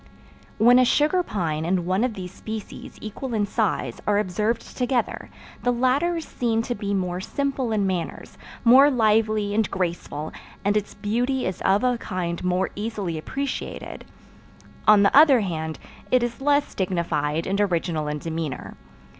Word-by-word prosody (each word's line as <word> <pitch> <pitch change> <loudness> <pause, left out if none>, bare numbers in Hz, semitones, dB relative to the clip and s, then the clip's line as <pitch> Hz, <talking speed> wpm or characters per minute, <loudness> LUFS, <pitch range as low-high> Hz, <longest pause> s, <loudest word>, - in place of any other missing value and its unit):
When 245 +3 +6
a - - +6
sugar 300 +8 +3
pine 165 - -2
and 175 +1 0
one 185 +5 +1
of 250 -4 -1
this 180 -2 -6
species 220 0 -8
equal 230 +3 -5
in 210 -1 +1
size 210 0 -1
are 205 -1 +3
observed 210 +4 -1
together, 250 -2 -1 0.3
the 245 - 0
latter 260 +8 +1
is 325 -2 -4
seen 230 -2 0
to 245 - -2
be 200 -2 -4
more 180 -1 -2
simple 275 +1 -2
in 210 -2 +1
manners, 180 -3 -3 0.3
more 260 +4 +7
lively 215 -4 +2
and 215 -1 +1
graceful, 170 -4 -3 0.3
and 205 +1 +2
its 210 -1 -2
beauty 245 +5 -1
is 185 - -3
of 200 +5 +2
a 250 -2 +1
kind 175 -4 -3
more 180 +1 0
easily 205 -6 -3
appreciated; 275 - -5 0.8
on 210 -1 +7
the 200 - +3
other 280 -5 +7
hand 160 -5 -3 0.3
it 255 -1 +3
is 240 +2 -3
less 285 +1 +2
dignified 165 -4 -1
and 200 +2 0
original 170 -5 0
in 150 0 -2
demeanor. 160 -4 -5
210 Hz, 160 wpm, -24 LUFS, 180-245 Hz, 0.8 s, more